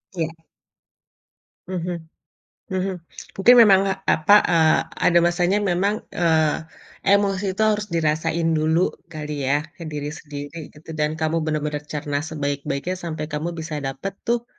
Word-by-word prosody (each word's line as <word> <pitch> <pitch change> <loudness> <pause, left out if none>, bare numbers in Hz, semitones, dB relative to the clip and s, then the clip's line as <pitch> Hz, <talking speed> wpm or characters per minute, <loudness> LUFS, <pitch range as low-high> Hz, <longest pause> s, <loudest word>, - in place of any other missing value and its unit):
Iya. 165 -1 -1 1.4
Mhm. 180 -1 -3 0.7
Mhm. 190 0 -1 0.5
Mungkin 245 +5 +8
memang, 195 -3 +6 0.3
apa, 180 +6 +5
eee, 160 -2 +4 0.3
ada 175 -1 +5
masanya 175 +3 +2
memang, 200 +4 0
eee, 160 -3 +2 0.5
emosi 195 -1 +2
itu 220 - +1
harus 210 -1 +1
dirasain 165 +1 +1
dulu 160 +3 +2 0.2
kali 150 -3 -4
ya, 145 +2 +2 0.2
ke 170 - -7
diri 150 -1 -4
sendiri 150 +1 -8
gitu. 155 +2 -13
Dan, 150 +1 +1
kamu 160 +1 0
bener-bener 150 -1 -1
cerna 145 -1 -2
sebaik-baiknya 145 +2 -3
sampai 155 -2 -3
kamu 150 +3 -2
bisa 160 -2 -4
dapet 135 +8 -4
tuh 235 0 +1
160 Hz, 130 wpm, -22 LUFS, 150-185 Hz, 1.4 s, Mungkin